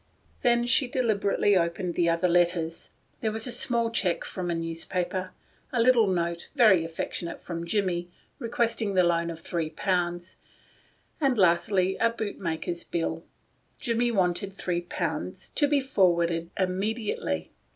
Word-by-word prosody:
Then 240 0 +3
she 255 +2 +4
deliberately 210 -5 +1
opened 175 0 0
the 170 0 +2
other 170 +2 +2
letters. 170 -1 +1 0.3
There 220 - -1
was 220 +1 -1
a 250 - -1
small 235 -1 +2
check 185 -6 0
from 185 -2 -4
the 170 - 0
editor 165 0 -3
of 165 - -3 0.3
The - - -14
Fan; 185 0 -3 0.4
a 245 - +1
little 230 -2 +5
note 170 -2 -1
— - - -40
very 190 -8 +6
aff 165 0 -9
ec - - -2
tionate 170 -1 -5
from 170 -1 -6
Jimmie, 175 -2 0 0.3
requesting 230 -4 -1
the 185 - +5
loan 170 -1 +1
of 165 -1 -7
three 165 -2 -2
pounds; 175 +1 -2 0.8
and 270 -4 +2
lastly, 185 +1 +3
a 230 - +3
bootmaker's 175 -6 -4
bill. 165 -1 -3 0.5
Jimmie 240 0 +1
wanted 190 -1 0
three 180 -2 -2
pounds 175 - -4
to 290 - +3
be 290 0 +3
forwarded 170 -9 +1
immediately. 190 - -2
185 Hz, 160 wpm, -27 LUFS, 170-225 Hz, 0.8 s, very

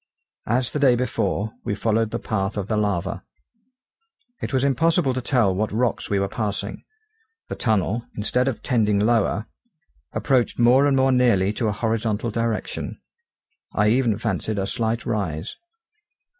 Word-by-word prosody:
As 120 +2 +1
the 150 - -2
day 135 -4 +5
before, 110 -3 -1
we 100 - -2
followed 110 +1 +1
the - - -2
path 95 -2 -2
of 100 - -1
the 110 - 0
lava. 100 -3 -1 1.2
It - - -3
was 130 -1 +1
impossible 145 +1 +2
to 130 - -2
tell 120 -7 +2
what 105 +3 -1
rocks 115 +2 -1
we 100 - +1
were 100 0 +1
passing: 100 0 -3 0.7
the - - -3
tunnel, 110 0 0
instead 125 +5 +1
of 135 - -2
tending 105 -4 +2
lower, 110 0 +2 0.7
approached 130 -4 +1
more 125 +4 +5
and 135 -1 +3
more 130 0 +4
nearly 115 -6 +3
to 115 0 -1
a - - +1
horizontal 110 +1 -1
direction, 115 0 -3 0.8
I 105 0 +3
even 120 -2 +2
fancied 110 -1 -2
a 95 - 0
slight 115 +2 -2
rise. 95 -7 -3
110 Hz, 155 wpm, -23 LUFS, 105-125 Hz, 1.2 s, day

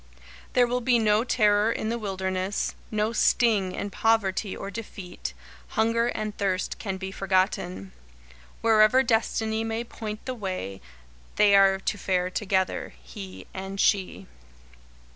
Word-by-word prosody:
There 245 - +5
will 245 +1 -1
be 245 0 +3
no 215 -1 +3
terror 210 -3 +3
in 215 - -2
the 235 +1 -2
wilderness, 190 -1 -2 0.2
no 215 +1 0
sting 210 -6 +3
in 200 - -4
poverty 205 -2 +1
or 195 - -6
defeat 195 -4 -7 0.4
hunger 230 +1 +2
and 215 -3 -3
thirst 185 -2 -1
can 195 -3 -3
be 190 0 -5
forgotten. 185 - -1 0.7
Wherever 225 +3 +5
Destiny 225 -1 0
may 225 +1 -2
point 215 -2 -7
the 260 - -3
way, 185 - -5 0.5
they 205 -1 +5
are 195 -1 +6
to 205 - -2
fare 180 -1 0
together 190 - -1
he 95 +10 -9
and 195 +1 -6
she. 185 - +1
205 Hz, 135 wpm, -26 LUFS, 190-225 Hz, 0.7 s, are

